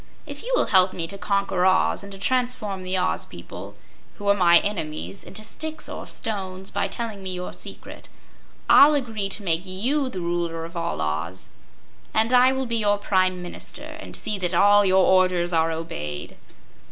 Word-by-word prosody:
If -, -, -8 dB
you -, -, -5 dB
will -, -, +3 dB
help 185 Hz, -1 st, +4 dB
me 170 Hz, -, -4 dB
to 200 Hz, +4 st, -5 dB
conquer 195 Hz, -1 st, 0 dB
Oz 185 Hz, +1 st, +3 dB
and 200 Hz, -, -9 dB
to 195 Hz, -, -7 dB
transform 245 Hz, -3 st, 0 dB
the 185 Hz, +1 st, -2 dB
Oz 185 Hz, 0 st, 0 dB
people, -, -, -10 dB, 0.4 s
who 205 Hz, -, -7 dB
are -, -, +7 dB
my 175 Hz, -3 st, +6 dB
enemies, 180 Hz, -1 st, -4 dB
into 215 Hz, -, -8 dB
sticks 315 Hz, +8 st, -5 dB
or -, -, -7 dB
stones, 190 Hz, -3 st, -4 dB
by 200 Hz, -, 0 dB
telling 225 Hz, -4 st, -5 dB
me 190 Hz, -1 st, -4 dB
your 180 Hz, 0 st, -5 dB
secret, -, -, -10 dB, 0.6 s
I'll 295 Hz, +2 st, +8 dB
agree 220 Hz, -7 st, -1 dB
to 205 Hz, +2 st, -2 dB
make 165 Hz, -3 st, +1 dB
YOU 250 Hz, +10 st, -1 dB
the 190 Hz, -, -6 dB
Ruler 170 Hz, -1 st, -2 dB
of 170 Hz, +2 st, -11 dB
all 170 Hz, -, -2 dB
Oz, 80 Hz, +4 st, -3 dB, 0.7 s
and 225 Hz, +3 st, +2 dB
I 250 Hz, +1 st, +6 dB
will 265 Hz, 0 st, -1 dB
be 235 Hz, -1 st, -1 dB
your 205 Hz, -2 st, +2 dB
Prime 185 Hz, -3 st, +1 dB
Minister 175 Hz, +10 st, -8 dB, 0.2 s
and -, -, -8 dB
see 210 Hz, -2 st, -1 dB
that 180 Hz, -1 st, -1 dB
your 195 Hz, 0 st, +5 dB
orders 185 Hz, -2 st, +3 dB
are 165 Hz, 0 st, +2 dB
obeyed." 75 Hz, -, -5 dB
190 Hz, 180 wpm, -24 LUFS, 175-215 Hz, 0.7 s, I'll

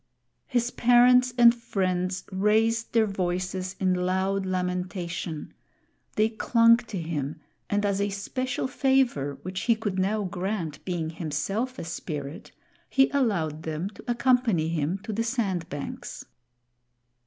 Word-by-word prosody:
His 245 Hz, -1 st, 0 dB
parents 250 Hz, +1 st, +5 dB
and 235 Hz, -1 st, +8 dB
friends 185 Hz, -5 st, -1 dB
raised 220 Hz, +4 st, +2 dB
their 225 Hz, -1 st, +4 dB
voices 185 Hz, -1 st, -2 dB
in 185 Hz, -1 st, +2 dB
loud 190 Hz, +2 st, 0 dB
lamentation; 180 Hz, -3 st, -3 dB, 0.6 s
they 215 Hz, +1 st, +4 dB
clung 230 Hz, +1 st, +4 dB
to 225 Hz, -5 st, -6 dB
him, 155 Hz, -2 st, -3 dB, 0.3 s
and 205 Hz, 0 st, +1 dB
as 200 Hz, -1 st, +1 dB
a 200 Hz, -, +1 dB
special 250 Hz, +7 st, -3 dB
favor, 255 Hz, -, +1 dB
which 185 Hz, +1 st, -4 dB
he 230 Hz, -, +4 dB
could 205 Hz, -4 st, -3 dB
now 205 Hz, +3 st, +1 dB
grant, 180 Hz, -4 st, -3 dB
being 170 Hz, -3 st, -2 dB
himself 185 Hz, -, -2 dB
a -, -, -5 dB
spirit, 150 Hz, -3 st, -6 dB, 0.4 s
he 270 Hz, -1 st, +4 dB
allowed 185 Hz, -, 0 dB
them 160 Hz, +4 st, -3 dB
to -, -, -14 dB
accompany 240 Hz, -8 st, +2 dB
him 165 Hz, +2 st, -1 dB
to 220 Hz, -, -4 dB
the 225 Hz, +3 st, 0 dB
sand 210 Hz, -8 st, -1 dB
banks. 145 Hz, 0 st, -6 dB
195 Hz, 130 wpm, -27 LUFS, 175-230 Hz, 0.6 s, and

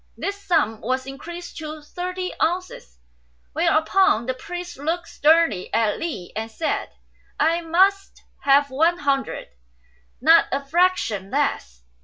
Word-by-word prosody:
This 400 Hz, 0 st, -4 dB
sum 225 Hz, -, +1 dB
was 260 Hz, +2 st, -1 dB
increased 340 Hz, +6 st, -8 dB
to 310 Hz, -1 st, -6 dB
thirty 365 Hz, +3 st, -4 dB
ounces, 345 Hz, -, -2 dB, 0.6 s
whereupon 315 Hz, -, +3 dB
the 260 Hz, -, -1 dB
priest 355 Hz, +4 st, -7 dB
looked 330 Hz, +4 st, -2 dB
sternly 305 Hz, -, +2 dB
at 220 Hz, -2 st, +1 dB
Li 285 Hz, -, -5 dB
and 220 Hz, +1 st, -3 dB
said, 310 Hz, +8 st, -2 dB, 0.5 s
"I 330 Hz, +2 st, +2 dB
must 385 Hz, +4 st, +1 dB, 0.2 s
have 280 Hz, 0 st, +4 dB
one 325 Hz, +6 st, +2 dB
hundred; 280 Hz, -3 st, -1 dB, 0.7 s
not 325 Hz, +5 st, +6 dB
a 275 Hz, +1 st, -2 dB
fraction 295 Hz, -, +1 dB
less." 65 Hz, -, -2 dB
315 Hz, 125 wpm, -23 LUFS, 260-350 Hz, 0.7 s, not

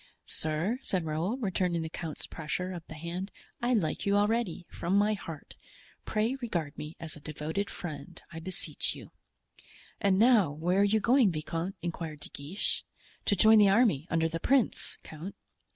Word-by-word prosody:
"Sir," 160 Hz, +10 st, 0 dB
said 180 Hz, -9 st, -1 dB
Raoul, 165 Hz, +9 st, -1 dB
returning 180 Hz, -7 st, 0 dB
the 160 Hz, -, -4 dB
count's 160 Hz, -3 st, -5 dB
pressure 165 Hz, +4 st, -3 dB
of 175 Hz, -3 st, -6 dB
the 160 Hz, -, -8 dB
hand, 170 Hz, +5 st, -4 dB, 0.3 s
"I 245 Hz, +1 st, +3 dB
like 165 Hz, -8 st, 0 dB
you 200 Hz, 0 st, +2 dB
already, 205 Hz, -4 st, +1 dB
from 180 Hz, +3 st, -1 dB
my 210 Hz, +1 st, +4 dB
heart; 165 Hz, -7 st, -7 dB, 0.5 s
pray 220 Hz, +3 st, +1 dB
regard 170 Hz, -11 st, -2 dB
me 150 Hz, +2 st, -7 dB
as 160 Hz, -1 st, -4 dB
a -, -, -10 dB
devoted 155 Hz, +7 st, -3 dB
friend, 150 Hz, -5 st, -7 dB
I 165 Hz, -, -5 dB
beseech 185 Hz, +3 st, -3 dB
you." -, -, -11 dB, 0.9 s
"And 195 Hz, -2 st, +3 dB
now, 220 Hz, -, +6 dB
where 170 Hz, +6 st, +1 dB
are -, -, +6 dB
you 210 Hz, +2 st, +4 dB
going, 240 Hz, -2 st, +5 dB
viscount?" 165 Hz, +4 st, -3 dB
inquired 160 Hz, -3 st, -4 dB
De -, -, -7 dB
Guiche. 150 Hz, +8 st, -2 dB, 0.4 s
"To 205 Hz, -, +3 dB
join 220 Hz, +3 st, +7 dB
the 205 Hz, -1 st, +7 dB
army, 195 Hz, -, +4 dB
under 165 Hz, -1 st, +2 dB
the 165 Hz, +1 st, -3 dB
prince, 265 Hz, +5 st, +2 dB
count." 160 Hz, +5 st, -8 dB
180 Hz, 170 wpm, -30 LUFS, 160-205 Hz, 0.9 s, join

